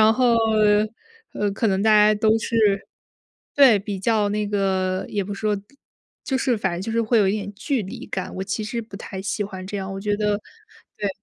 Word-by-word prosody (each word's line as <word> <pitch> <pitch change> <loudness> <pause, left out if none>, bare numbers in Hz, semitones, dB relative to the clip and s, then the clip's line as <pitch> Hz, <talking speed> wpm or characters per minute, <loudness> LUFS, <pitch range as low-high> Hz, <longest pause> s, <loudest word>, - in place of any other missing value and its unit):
然 220 +1 +6
后， 245 -1 +3 1.0
呃， 205 -1 -1
可 225 - 0
能 195 -1 +1
大 220 - +4
家 210 0 +6
都 220 +1 +3
是 210 -3 +1 0.7
对， 265 -7 +7
比 200 -1 -5
较 210 0 +1
那 210 0 -1
个 190 -2 0
也 200 -2 -2
不 200 +1 -5
是 - - -9
说 210 -1 +1 0.7
就 265 - -1
是 255 -3 +1
反 190 -3 -1
正 175 - -4
就 225 +4 -4
是 230 0 +1
会 225 +1 +2
有 200 - +4
一 - - +2
点 205 -1 -4
距 250 +4 -2
离 190 - -8
感， 190 - -4
我 190 - -3
其 195 +3 -3
实 235 +2 -3
不 215 -3 -10
太 190 -2 -7
喜 200 +2 -2
欢 190 -2 -7
这 200 +1 -5
样， 195 0 -4
我 195 - -5
觉 205 0 0
得 210 -1 0 0.6
对。 205 -1 -1
205 Hz, 235 characters per minute, -23 LUFS, 195-220 Hz, 1.0 s, 对